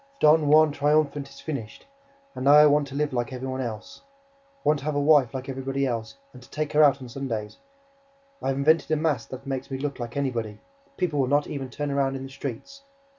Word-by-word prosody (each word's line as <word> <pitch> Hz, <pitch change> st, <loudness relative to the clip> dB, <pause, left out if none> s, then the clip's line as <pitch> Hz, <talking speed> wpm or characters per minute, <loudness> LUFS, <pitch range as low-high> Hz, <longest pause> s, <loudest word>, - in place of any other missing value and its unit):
Don 155 Hz, 0 st, +5 dB
Juan 155 Hz, +1 st, +6 dB
Triumphant 145 Hz, -1 st, +1 dB
is -, -, -15 dB
finished; 135 Hz, -9 st, -6 dB, 0.5 s
and 130 Hz, -, -5 dB
now 140 Hz, -, +7 dB
I 150 Hz, 0 st, +9 dB
want 145 Hz, -1 st, +3 dB
to 135 Hz, -, -9 dB
live 150 Hz, -1 st, -1 dB
like 120 Hz, +2 st, -2 dB
everybody 130 Hz, +1 st, -4 dB
else. 110 Hz, -3 st, -7 dB
I 275 Hz, 0 st, -35 dB
want 150 Hz, 0 st, +2 dB
to 140 Hz, -, -10 dB
have 155 Hz, -1 st, -1 dB
a -, -, +1 dB
wife 145 Hz, -4 st, +4 dB
like 130 Hz, +1 st, -6 dB
everybody 135 Hz, +1 st, -2 dB
else 115 Hz, -, -4 dB, 0.2 s
and 125 Hz, -, -13 dB
to 125 Hz, -, -17 dB
take 155 Hz, -1 st, -3 dB
her 150 Hz, -, +5 dB
out 140 Hz, -2 st, +4 dB
on -, -, -8 dB
Sundays. 115 Hz, -4 st, -5 dB, 0.8 s
I -, -, -3 dB
have 135 Hz, 0 st, 0 dB
invented 155 Hz, +4 st, +3 dB
a 155 Hz, -, +2 dB
mask 150 Hz, -6 st, -1 dB
that 130 Hz, +1 st, -8 dB
makes 135 Hz, -1 st, -4 dB
me 135 Hz, -, -3 dB
look 140 Hz, 0 st, -4 dB
like 120 Hz, +2 st, -6 dB
anybody. 115 Hz, -6 st, -2 dB, 0.4 s
People 160 Hz, -5 st, -1 dB
will 130 Hz, -, +2 dB
not 145 Hz, +2 st, +2 dB
even 135 Hz, -3 st, -5 dB
turn 145 Hz, +3 st, -4 dB
round 135 Hz, -1 st, 0 dB
in 135 Hz, -, -6 dB
the 135 Hz, -, -8 dB
streets. 140 Hz, -, -7 dB
140 Hz, 230 wpm, -25 LUFS, 130-150 Hz, 0.8 s, I